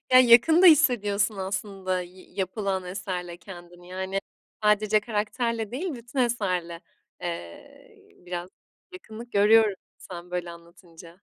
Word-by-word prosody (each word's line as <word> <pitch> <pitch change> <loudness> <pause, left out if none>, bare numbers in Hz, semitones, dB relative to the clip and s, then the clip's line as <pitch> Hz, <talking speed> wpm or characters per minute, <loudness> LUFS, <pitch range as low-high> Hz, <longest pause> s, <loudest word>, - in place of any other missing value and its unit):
Ya, 255 - +9
yakın 255 +8 +6
da - - +9
hissediyorsun 210 - +4
aslında 190 -1 -3
yi 180 +1 -12
yapılan 190 0 -2
eserle 180 -2 -5
kendini. 175 -1 -13
Yani, 190 +1 -3 0.4
sadece 210 0 +3
karakterle 220 +1 -2
değil, 310 +6 -3
bütün 240 +2 -8
eserle, 185 -8 -1 0.4
eee, 170 - -9
biraz 175 0 -5 0.4
yakınlık 240 -9 -11
görüyorum, 210 0 +5 0.2
sen 175 -1 -10
böyle 180 -1 -3
anlatınca. 170 0 -15
195 Hz, 120 wpm, -26 LUFS, 180-225 Hz, 0.4 s, Ya